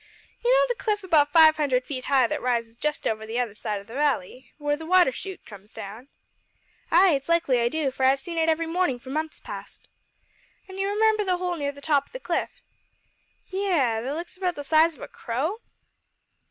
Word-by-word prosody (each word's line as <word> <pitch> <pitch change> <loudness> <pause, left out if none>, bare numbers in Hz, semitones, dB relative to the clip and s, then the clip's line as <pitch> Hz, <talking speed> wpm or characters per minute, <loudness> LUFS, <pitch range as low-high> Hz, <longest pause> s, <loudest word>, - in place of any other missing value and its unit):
"You 480 - +1
know - - +5
the 485 -1 -3
cliff 420 -3 0
about 305 -5 +3
five 315 0 +7
hundred 260 -4 +1
feet 255 -3 -5
high 270 -3 +4
that - - -2
rises 230 -2 -1
just 300 +5 -2
over 220 0 -1
on 220 - -8
the 225 +2 -4
other 240 -4 -1
side 210 -1 -3
o' - - -12
the 225 +3 -13
valley 260 -4 -1
where 290 -1 0
the 320 - -9
water 360 -5 +5
shoot 380 +9 -8
comes 205 0 -13
down?" 215 +6 -9 0.8
"Ay, 360 +2 +6
it's 275 +2 -2
likely 305 -8 +2
I 235 - +2
do, 300 -1 -1
for 265 - -4
I've 265 +1 +4
seen 335 +4 -4
it 325 0 +2
every 325 +1 +1
mornin' 330 -5 0
for 260 +2 -11
months 310 +2 -3
past." - - -10 0.8
"An' 380 0 -9
you 390 - 0
remember 430 +1 +2
the 365 -2 0
hole 360 -1 -2
near 285 -3 -2
the 285 0 -14
top 285 -2 +2
o' - - -26
the - - -6
cliff?" - - -3 0.9
"Yes 320 - +1
that 270 +4 -3
looks 340 +3 -6
about 365 -2 -1
the 290 - -6
size 315 +3 +3
of - - -17
a - - -6
crow?" 290 - -3
295 Hz, 220 wpm, -25 LUFS, 255-355 Hz, 0.9 s, five